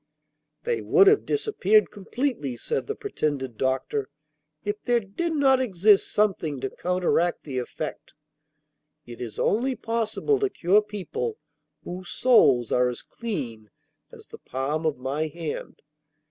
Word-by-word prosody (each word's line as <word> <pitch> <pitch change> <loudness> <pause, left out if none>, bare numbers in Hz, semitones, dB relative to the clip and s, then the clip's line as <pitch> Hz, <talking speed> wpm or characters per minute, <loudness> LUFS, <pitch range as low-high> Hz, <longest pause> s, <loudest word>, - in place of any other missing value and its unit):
'They 475 -1 -1
would 400 -2 +5
have 410 +1 +4
disappeared 220 - +2
completely,' 205 - -3
said 460 - -3
the 430 - -3
pretended 145 - -3
doctor, 130 +3 -1 0.6
'if 205 +1 -2
there 240 -1 +3
did 230 - -3
not 275 -4 +4
exist 205 -3 +3
something 175 -9 +1
to 135 0 -3
counteract 175 -1 0
the 135 -4 -3
effect. 125 - -6 0.9
It 120 0 -10
is 115 -3 -6
only 255 +5 +1
possible 230 - 0
to 405 -1 +1
cure 195 - +3
people 215 - -4 0.5
whose 180 0 -7
souls 135 - +4
are 125 0 +3
as 125 - -6
clean 130 - -5 0.4
as - - -13
the - - -11
palm 145 +5 -2
of 150 - -1
my 140 +5 -2
hand. 160 0 -6
190 Hz, 135 wpm, -25 LUFS, -, 0.9 s, would